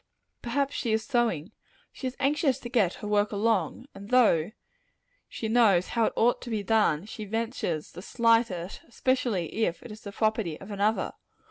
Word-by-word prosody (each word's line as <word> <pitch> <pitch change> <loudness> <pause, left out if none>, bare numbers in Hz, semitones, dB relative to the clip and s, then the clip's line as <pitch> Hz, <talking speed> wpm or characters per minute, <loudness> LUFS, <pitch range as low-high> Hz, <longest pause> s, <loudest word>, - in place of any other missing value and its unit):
Perhaps 275 +4 -1
site 230 -3 0
is 220 0 0
sewing. 230 - 0 0.4
She 260 - -5
is 255 - -6
anxious 285 -1 +2
to 240 - -6
get 215 -8 +2
her 210 - -7
work 205 0 +2
along; 210 0 0
and 200 +1 -11
though 215 -9 +4 0.8
she 225 - -4
know, 220 -5 +5
how 225 +5 0
it - - -1
ought 240 +2 +2
to 245 - -7
be 215 -3 -2
done, 200 -6 +2
she 215 0 -7
ventures 220 -7 -3
to - - -9
slight 230 +2 +3
it 180 0 -6
especially 235 - -1
if 175 -4 -1
it 240 - -9
is 215 +1 -10
the 200 - -8
property 215 -6 -1
of 195 +2 -10
another. 205 +2 0
220 Hz, 180 wpm, -27 LUFS, 195-240 Hz, 0.8 s, know